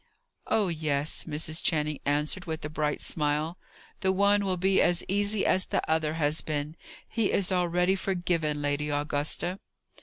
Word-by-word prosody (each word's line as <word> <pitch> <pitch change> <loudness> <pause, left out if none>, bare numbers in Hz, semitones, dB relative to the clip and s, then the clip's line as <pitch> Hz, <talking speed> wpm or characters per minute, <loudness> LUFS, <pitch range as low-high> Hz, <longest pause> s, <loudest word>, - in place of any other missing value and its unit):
"Oh 215 -3 +2
yes," 155 -2 0
Mrs. 155 +1 -3
Channing 150 -2 0
answered, 150 +5 0
with 160 -2 -4
a 150 - -5
bright 150 -1 -1
smile. 150 +3 -1 0.4
"The 190 - +2
one 200 +2 +3
will 190 -2 -1
be 190 +2 +3
as 175 0 +3
easy 205 +1 +1
as 185 - +2
the - - -1
other 160 -1 0
has 150 -1 +2
been. 150 0 -3 0.3
He 225 -3 0
is 195 -1 +2
already 180 +1 +2
forgiven, 175 -6 -1
Lady 145 +1 -1
Augusta." 145 +5 -1
160 Hz, 155 wpm, -28 LUFS, 150-185 Hz, 0.4 s, one